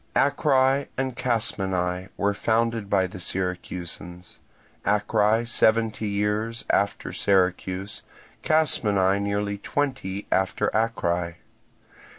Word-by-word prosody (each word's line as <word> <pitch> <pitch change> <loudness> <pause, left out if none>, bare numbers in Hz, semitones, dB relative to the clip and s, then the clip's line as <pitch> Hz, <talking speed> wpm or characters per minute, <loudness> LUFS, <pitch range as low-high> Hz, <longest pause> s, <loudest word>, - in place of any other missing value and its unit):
Acrae 135 -1 +3
and 130 -1 -1
Casmenae 95 -6 -1
were 100 0 +1
founded 115 0 0
by 95 -2 +3
the 90 0 -8
Syracusans; 90 -1 -5 0.4
Acrae 105 +2 +2
seventy 110 -1 +2
years 105 +3 -1
after 100 0 0
Syracuse, 95 0 0 0.4
Casmenae 100 -11 +2
nearly 100 0 -1
twenty 130 -8 -2
after 95 0 +1
Acrae. 90 -6 0
100 Hz, 90 wpm, -25 LUFS, 95-115 Hz, 0.4 s, Acrae